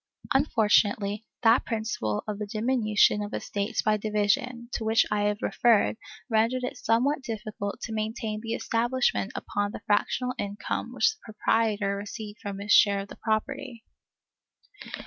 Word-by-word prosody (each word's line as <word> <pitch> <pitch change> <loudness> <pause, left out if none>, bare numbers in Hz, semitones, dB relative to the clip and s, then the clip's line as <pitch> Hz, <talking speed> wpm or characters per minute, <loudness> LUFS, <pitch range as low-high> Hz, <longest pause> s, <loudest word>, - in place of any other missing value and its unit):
Unfortunately, 215 -5 +2 0.2
that 230 +2 +5
principle 215 - -2
of 210 -1 -4
the 210 - -3
diminution 215 -1 +2
of 205 0 -4
estates 205 +3 -2
by 215 0 +3
division, 215 +3 0
to - - -2
which 220 +1 +3
I 205 0 +1
have 205 0 -1
referred, 230 -3 +3 0.3
rendered 230 +2 +1
it 250 - -4
somewhat 270 +6 +1
difficult 215 -4 -5
to 225 - -5
maintain 215 0 -3
the 225 0 -3
establishment 240 -2 0
upon 205 0 -2
the - - -7
fractional 250 +4 +1
income 205 0 -3
which 460 - +3
the 435 - -25
proprietor 215 -2 0
received 210 +1 -7
from 200 -1 -5
his 205 +1 -4
share 200 -1 +6
of 200 - -9
the - - -9
property. 235 +2 -3
215 Hz, 145 wpm, -27 LUFS, 205-235 Hz, 0.3 s, share